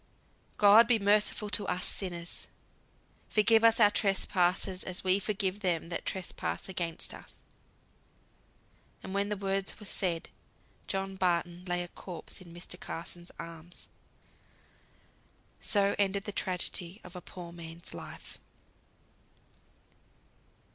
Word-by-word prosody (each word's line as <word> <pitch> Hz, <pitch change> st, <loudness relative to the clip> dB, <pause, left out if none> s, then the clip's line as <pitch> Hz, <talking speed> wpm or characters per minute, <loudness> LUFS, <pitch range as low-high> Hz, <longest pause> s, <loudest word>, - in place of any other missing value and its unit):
"God 210 Hz, +3 st, +8 dB
be 240 Hz, -1 st, +5 dB
merciful 210 Hz, 0 st, +2 dB
to 205 Hz, -1 st, +2 dB
us 180 Hz, 0 st, 0 dB
sinners. 175 Hz, -3 st, -3 dB, 0.8 s
Forgive 225 Hz, +1 st, +5 dB
us 230 Hz, 0 st, +6 dB
our 210 Hz, -2 st, +7 dB
trespasses 190 Hz, -2 st, +2 dB
as 185 Hz, -1 st, -5 dB
we 185 Hz, +1 st, +4 dB
forgive 200 Hz, -1 st, -1 dB
them 170 Hz, -4 st, 0 dB
that 170 Hz, -, -4 dB
trespass 190 Hz, -2 st, -2 dB
against 170 Hz, -3 st, -1 dB
us." -, -, -13 dB, 1.6 s
And 190 Hz, -, -6 dB
when 200 Hz, +1 st, +1 dB
the 210 Hz, -, -1 dB
words 195 Hz, 0 st, -1 dB
were 210 Hz, -, -10 dB
said, 175 Hz, -4 st, -1 dB, 0.6 s
John 195 Hz, 0 st, -2 dB
Barton 175 Hz, -1 st, 0 dB
lay 175 Hz, -1 st, 0 dB
a -, -, -6 dB
corpse 175 Hz, +1 st, -8 dB
in 175 Hz, -2 st, -12 dB
Mr. 175 Hz, +1 st, -9 dB
Carson's 175 Hz, +1 st, -6 dB
arms. 165 Hz, +1 st, -9 dB, 1.7 s
So 200 Hz, -2 st, +3 dB
ended 200 Hz, 0 st, +2 dB
the 205 Hz, -, -4 dB
tragedy 185 Hz, 0 st, -2 dB
of 180 Hz, 0 st, -12 dB
a 180 Hz, -, -6 dB
poor 175 Hz, -1 st, -9 dB
man's 170 Hz, 0 st, -9 dB
life. -, -, -9 dB
190 Hz, 120 wpm, -31 LUFS, 175-200 Hz, 1.7 s, God